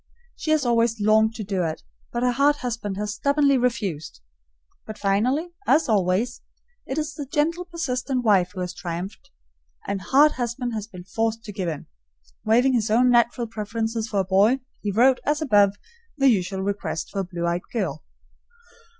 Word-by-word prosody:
She -, -, -5 dB
has 310 Hz, -3 st, +3 dB
always 230 Hz, -1 st, +2 dB
longed 220 Hz, +1 st, +3 dB
to 220 Hz, -, -5 dB
do 195 Hz, -2 st, -2 dB
it, 160 Hz, -2 st, -3 dB, 0.3 s
but 240 Hz, +1 st, -2 dB
her 250 Hz, -, +3 dB
hard 280 Hz, +3 st, +3 dB
husband 230 Hz, -7 st, -4 dB
has 210 Hz, 0 st, -2 dB
stubbornly 280 Hz, +1 st, +2 dB
refused. 205 Hz, -, -2 dB, 0.6 s
But 215 Hz, -1 st, -8 dB
finally, 245 Hz, -, +1 dB, 0.2 s
as 305 Hz, +4 st, +4 dB
always, 210 Hz, +3 st, +1 dB, 0.5 s
it 265 Hz, -, -3 dB
is 305 Hz, 0 st, -2 dB
the 290 Hz, -3 st, -6 dB
gentle, 330 Hz, +5 st, 0 dB
persistent 265 Hz, -7 st, -2 dB
wife 185 Hz, -4 st, +3 dB
who 185 Hz, -, -4 dB
has 180 Hz, -1 st, -3 dB
triumphed, 175 Hz, +2 st, -6 dB, 0.6 s
and 200 Hz, -1 st, -3 dB
hard 285 Hz, +9 st, +5 dB
husband 240 Hz, 0 st, -3 dB
has 215 Hz, -1 st, -4 dB
been 180 Hz, -5 st, -11 dB
forced 225 Hz, +3 st, -2 dB
to 210 Hz, -, -8 dB
give 190 Hz, -4 st, -2 dB
in. 155 Hz, -3 st, -6 dB, 0.6 s
Waiving 245 Hz, +4 st, +3 dB
his 225 Hz, -3 st, +1 dB
own 245 Hz, +3 st, +4 dB
natural 240 Hz, 0 st, +3 dB
preference 225 Hz, 0 st, -3 dB
for 205 Hz, -3 st, 0 dB
a -, -, -4 dB
boy, 205 Hz, +8 st, +3 dB, 0.2 s
he 210 Hz, -, -2 dB
wrote, 250 Hz, +6 st, +4 dB
as 295 Hz, 0 st, 0 dB
above, 205 Hz, -9 st, +4 dB, 0.4 s
the 275 Hz, -1 st, +5 dB
usual 190 Hz, -3 st, 0 dB
request 195 Hz, -6 st, -3 dB
for 200 Hz, -, -3 dB
a -, -, 0 dB
blue 175 Hz, -2 st, -4 dB
eyed 170 Hz, +1 st, 0 dB
girl. 190 Hz, -9 st, -3 dB
225 Hz, 175 wpm, -24 LUFS, 195-255 Hz, 0.6 s, hard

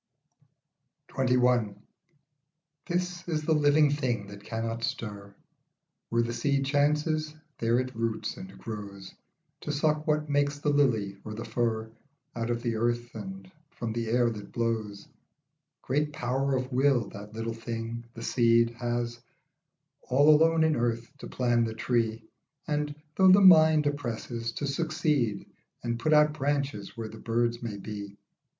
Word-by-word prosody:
24 125 Hz, -2 st, +3 dB
XXI. 105 Hz, -3 st, -6 dB, 1.1 s
THIS 180 Hz, -1 st, -2 dB
is 155 Hz, -2 st, -1 dB
the 160 Hz, -, +2 dB
living 150 Hz, 0 st, +4 dB
thing 130 Hz, -8 st, -1 dB
that 100 Hz, 0 st, -11 dB
cannot 115 Hz, +1 st, -4 dB
stir. 100 Hz, -4 st, -5 dB, 0.7 s
Where 115 Hz, 0 st, +2 dB
the 120 Hz, 0 st, -3 dB
seed 140 Hz, +1 st, 0 dB
chances 150 Hz, +2 st, +1 dB, 0.2 s
there 115 Hz, +1 st, +2 dB
it 130 Hz, -1 st, -4 dB
roots 115 Hz, -1 st, -2 dB
and 185 Hz, +2 st, -10 dB
grows, 100 Hz, -4 st, -8 dB, 0.5 s
To 150 Hz, -, -4 dB
suck 150 Hz, +1 st, 0 dB
what 150 Hz, 0 st, +1 dB
makes 145 Hz, 0 st, +1 dB
the 145 Hz, +1 st, 0 dB
lily 110 Hz, -9 st, +1 dB
or 110 Hz, -1 st, -6 dB
the 115 Hz, -, -6 dB
fir 110 Hz, -2 st, -1 dB, 0.4 s
Out 115 Hz, 0 st, -2 dB
of 120 Hz, 0 st, -2 dB
the 115 Hz, -2 st, -1 dB
earth 120 Hz, +1 st, -1 dB
and 190 Hz, -1 st, -8 dB, 0.2 s
from 115 Hz, -2 st, -5 dB
the 115 Hz, -1 st, -2 dB
air 120 Hz, 0 st, +3 dB
that 105 Hz, -2 st, -8 dB
blows, 110 Hz, -3 st, -2 dB, 0.8 s
Great 150 Hz, +3 st, 0 dB
power 135 Hz, 0 st, -1 dB
of 130 Hz, +1 st, -3 dB
Will 130 Hz, -3 st, +3 dB
that 105 Hz, +2 st, -10 dB
little 115 Hz, +1 st, -3 dB
thing 115 Hz, 0 st, -5 dB
the -, -, -7 dB
seed 115 Hz, -1 st, +3 dB
Has, 120 Hz, -1 st, -2 dB, 0.9 s
all 145 Hz, +4 st, +6 dB
alone 160 Hz, +1 st, +4 dB
in 160 Hz, -1 st, +3 dB
earth, 120 Hz, +2 st, -2 dB
to -, -, -8 dB
plan 120 Hz, -2 st, +1 dB
the 110 Hz, -1 st, -3 dB
tree, 115 Hz, -1 st, -1 dB, 0.4 s
And, 150 Hz, -1 st, -1 dB, 0.2 s
though 190 Hz, -1 st, +6 dB
the 195 Hz, -, +8 dB
mud 160 Hz, -5 st, +7 dB
oppresses, 120 Hz, -4 st, -3 dB
to 145 Hz, -, -3 dB
succeed 140 Hz, -7 st, 0 dB, 0.4 s
And 120 Hz, -1 st, -2 dB
put 155 Hz, -, 0 dB
out 150 Hz, 0 st, +5 dB
branches 140 Hz, -9 st, -2 dB
where 115 Hz, -1 st, -4 dB
the 110 Hz, +1 st, -11 dB
birds 120 Hz, +1 st, 0 dB
maybe. 100 Hz, -2 st, -6 dB
120 Hz, 150 wpm, -28 LUFS, 115-145 Hz, 1.1 s, the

